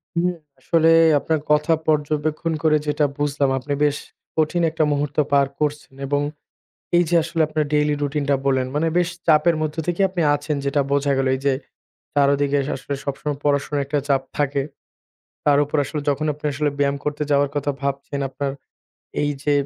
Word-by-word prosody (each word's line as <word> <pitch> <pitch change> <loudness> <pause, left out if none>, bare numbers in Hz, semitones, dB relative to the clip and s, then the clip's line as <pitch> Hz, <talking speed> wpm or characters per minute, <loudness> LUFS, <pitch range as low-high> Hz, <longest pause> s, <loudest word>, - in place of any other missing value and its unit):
হুম। 180 +1 +1 0.3
আসলে 165 +4 +3 0.3
আপনার 160 +3 0
কথা 150 +2 +3
পর্যবেক্ষণ 155 +2 0
করে 155 -1 +4
যেটা 150 0 +2
বুঝলাম, 145 -1 +1
আপনি 145 +3 -3
বেশ 145 0 +2 0.4
কঠিন 160 +3 +1
একটা 160 0 0
মুহূর্ত 145 0 -2
পার 140 -1 +4
করছেন। 150 -2 -2
এবং 145 +1 +1 0.8
এই 175 - +5
যে, 175 - 0
আসলে 165 +1 -4
আপনার 155 0 0
ডেইলি 150 0 +3
রুটিন 145 0 -1
টা 140 - +4
বললেন। 130 -2 +2
মানে 155 +2 +1
বেশ 175 - +2 0.2
চাপের 165 +1 +4
মধ্য 155 0 -2
থেকেই 175 +3 +1
আপনি 175 -3 -1
আছেন 145 0 -2
যেটা 140 +1 +1
বোঝা 140 0 +2
গেলো। 135 -1 +1
এই - - -9
যে 140 - +4 0.6
চারদিকে 140 0 +2 0.2
আসলে 140 +1 -5
সবসময় 140 +1 -3
পড়াশোনার 145 0 +1
একটা 145 +1 0
চাপ 135 -2 +2 0.2
থাকে। 140 -1 +1 0.8
তার 145 -1 +4
উপর 145 +2 -2
আসলে 150 +2 -4
যখন 145 +2 0
আপনি 150 - -6
আসলে 145 +2 0
ব্যায়াম 140 0 +1
করতে 150 0 -2
যাওয়ার 140 0 +3
কথা 145 0 0
ভাবছেন, 140 0 -3
আপনার 135 +1 -3 0.7
এই 145 - +1
যে 145 - +2
145 Hz, 175 wpm, -22 LUFS, 140-155 Hz, 0.8 s, এই